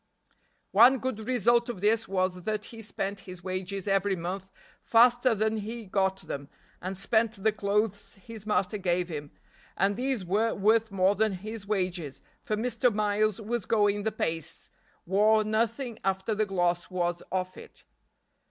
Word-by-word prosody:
One 240 +6 +7
good 230 -4 -4
result 240 -1 +3
of 235 - -4
this 220 +3 +2
was 185 -1 -1
that 215 +2 -2
he 225 -1 -9
spent 200 -1 -3
his 180 -1 -9
wages 185 +1 -3
every 195 0 +2
month 185 +2 -5 0.3
faster 240 +1 +4
than 220 +1 0
he 220 +2 -5
got 190 0 0
them, 140 0 -6 0.3
and 185 +1 -4
spent 220 +3 +2
the 215 +2 +1
clothes 205 0 -1
his 215 +1 -10
master 210 -1 0
gave 180 -1 0
him, 150 -3 -5 0.5
and 200 +1 +2
these 250 -4 -1
were 215 +5 +1
worth 220 +3 +3
more 195 0 +3
than 215 0 +1
his 210 +2 -7
wages, 180 -8 -2 0.2
for 215 - -2
Mr. 235 +2 +1
Miles 210 0 +1
was 225 0 -3
going 205 -2 +2
the 220 +2 -1
pace 165 -5 -2 0.3
wore 215 +4 +4
nothing 230 +3 -1
after 190 +3 0
the 215 0 0
gloss 175 -2 0
was 175 -1 -1
off 185 -1 -2
it. - - -13
205 Hz, 160 wpm, -28 LUFS, 185-220 Hz, 0.5 s, One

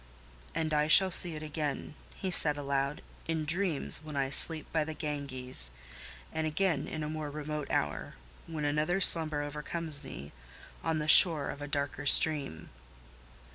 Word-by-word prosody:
"And 160 -1 -2
I 150 0 +1
shall 190 +4 +7
see 170 -1 +6
it 155 - -8
again," 150 -2 -5 0.2
he 190 - -5
said 150 -4 -1
aloud, 140 0 -3 0.2
"in 160 -1 -3
dreams 160 -2 0
when 155 -1 -9
I 135 -1 -2
sleep 160 +1 +1
by 160 -2 +1
the 155 0 -7
Ganges: 130 - -2 0.6
and 160 0 -2
again 155 -2 -1
in 155 - -6
a - - -4
more 155 -1 -5
remote 150 0 -6
hour—when 75 - -5
another 150 +5 -1
slumber 160 -5 +3
overcomes 150 +1 -5
me—on 70 - -8
the 150 0 -4
shore 155 -3 +5
of 145 - -11
a 145 - -6
darker 145 0 -4
stream!" 140 - +4
150 Hz, 150 wpm, -29 LUFS, 140-160 Hz, 0.6 s, shall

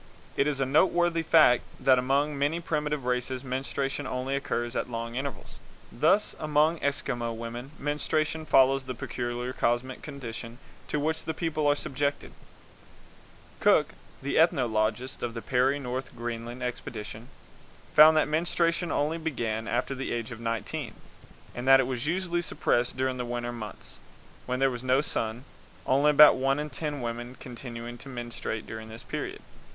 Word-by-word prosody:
It 140 - +2
is 145 -2 -1
a 135 - +2
noteworthy 170 +4 +3
fact 155 -6 +6 0.2
that 130 -1 +5
among 140 +4 +1
many 145 +4 0
primitive 150 -4 -2
races 125 +1 -1
menstruation 135 +1 -2
only 130 +2 -2
occurs 120 -3 -2
at - - -1
long 115 0 -4
intervals. 135 +2 -5 0.3
Thus 160 - +2
among 155 +2 +2
Eskimo 120 -4 -1
women 120 +3 -6
menstruation 155 +2 -1
follows 135 0 +5
the 130 -1 -5
peculiar 120 +1 -4
cosmic 125 +2 0
conditions 120 -4 -7 0.3
to 150 - -1
which 160 +2 -1
the 160 - -3
people 155 -3 0
are 145 - +4
subjected; 145 0 -2 1.3
Cook, - - +4 0.3
the 140 - +1
ethnologist 125 -5 +1
of 120 -1 -3
the 115 - -4
Peary 130 +2 +2
North 130 -1 -5
Greenland 120 +1 -5
expedition, 115 -2 -6 0.7
found 155 +1 +8
that 155 - +3
menstruation 170 +2 +1
only 155 +3 0
began 115 -8 -2
after 120 +3 -1
the 135 0 -4
age 115 -1 -3
of 115 - -7
nineteen, 115 -1 -3 0.6
and 120 +2 -5
that 135 0 +8
it 135 - +3
was 130 +1 -3
usually 175 0 0
suppressed 125 -7 0
during 130 0 0
the 125 - -2
winter 120 0 -3
months, 110 -4 -8 0.5
when 125 0 0
there 135 0 +2
is 120 - -5
no 130 +1 +3
sun, 115 -4 -3 0.4
only 140 +3 +4
about 150 0 +8
one 135 +1 +2
in 150 0 -4
ten 145 0 -3
women 120 +1 -4
continuing 120 -1 -8
to 135 - -10
menstruate 120 -3 -5
during 110 0 -8
this 110 +1 -9
period. - - -5
130 Hz, 155 wpm, -28 LUFS, 120-150 Hz, 1.3 s, found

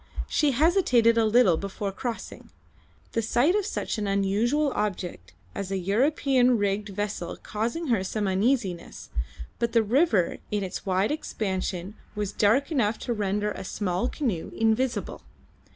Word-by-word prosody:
She 300 - +2
hesitated 255 - +4
a 230 -1 +3
little 215 -7 +5
before 200 +1 -4
crossing, 235 +3 -6 0.6
the 230 - 0
sight 245 +9 +2
of 415 -1 0
such 225 - -3
an 205 - -2
unusual 215 +9 +1
object 205 -5 -3 0.2
as 200 -2 -4
an 190 -2 -2
European 255 - +3
rigged 205 0 -1
vessel 200 -3 -4
causing 235 +9 -3
her 225 -6 +2
some 205 +1 -2
uneasiness, 195 -2 -1 0.5
but 235 -1 0
the 230 -2 +4
river 225 - +2
in 205 -1 -1
its 190 +2 -6
wide 190 +4 +2
expansion 190 - -3 0.2
was 205 -1 -2
dark 235 +9 +2
enough 225 -7 +1
to 240 - -3
render 210 0 -1
a - - -6
small 185 +4 -1
canoe 225 - -2
invisible. 225 +3 0
215 Hz, 145 wpm, -26 LUFS, 195-250 Hz, 0.6 s, little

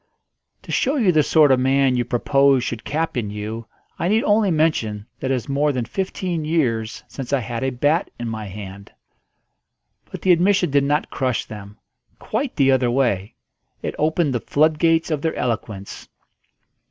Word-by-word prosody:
"To - - -8
show 275 +1 +1
you 225 -10 +3
the 155 -2 +4
sort 150 -1 +4
of 130 - +4
man 135 0 +3
you 125 - +1
propose 135 +2 +2
should 115 -2 -4
captain 145 -8 -2
you, 110 +2 -6 0.3
I 170 - 0
need 220 +4 +2
only 210 -1 +3
mention 150 - 0
that 130 - -3
it - - +2
is 125 - -5
more 145 +2 +1
than 125 -4 -2
fifteen 180 - -3
years 120 -9 -1
since 135 -2 -7
I 140 - +2
had 115 +1 -4
a 135 - +1
bat 145 +7 +1
in 120 - -5
my 110 -1 -4
hand." 100 0 -9 1.2
But - - -8
the 185 - +4
admission 180 -1 +3
did 140 0 +3
not 145 +2 0
crush 130 -3 -1
them: 105 -1 -10 0.4
quite 275 -2 -3
the 135 -2 +4
other 130 -2 +2
way. 120 -6 0 0.5
It - - -3
opened 155 -2 +1
the 120 - 0
floodgates 160 +4 +2
of 150 -2 -1
their 160 0 -1
eloquence. 105 -4 -4
135 Hz, 175 wpm, -21 LUFS, 115-160 Hz, 1.2 s, the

